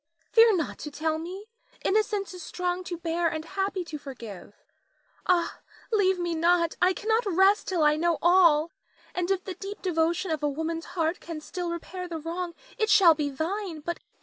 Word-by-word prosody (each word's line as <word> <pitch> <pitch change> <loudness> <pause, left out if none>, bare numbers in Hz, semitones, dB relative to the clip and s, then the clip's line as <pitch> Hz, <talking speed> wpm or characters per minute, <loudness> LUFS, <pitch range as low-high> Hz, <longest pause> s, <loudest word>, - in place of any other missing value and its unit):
Fear 455 -2 +7
not 330 -4 -2
to 300 - -5
tell 315 +2 -1
me; 375 +6 -7 0.4
innocence 415 -1 +1
is 365 - -9
strong 360 +1 -2
to 350 - -4
bear 335 0 0
and 315 -1 -3
happy 385 +1 -2
to 305 -2 -6
forgive. 225 -9 -9 0.7
Ah, 350 -2 +2 0.3
leave 380 -4 +3
me 345 -1 -1
not, 335 0 +2
I 360 +1 +5
cannot 440 +3 0
rest 385 +3 +4
till 350 -4 +1
I 300 0 +4
know 335 +1 +1
all, 340 -3 +5 0.4
and 360 0 -1
if 385 -1 +1
the 375 - -5
deep 395 +3 -8
devotion 340 0 +1
of 310 -2 -1
a 295 - +1
woman's 320 +3 -3
heart 325 +1 +1
can 330 -2 -6
still 350 +3 -5
repair 360 +2 -5
the 335 -2 -4
wrong, 340 +2 -4 0.2
it 435 0 +2
shall 390 -6 +7
be 300 -2 -2
thine 330 +4 -3
but 345 +3 -3
answer - - -30
me. - - -41
345 Hz, 195 wpm, -27 LUFS, 320-375 Hz, 0.7 s, Fear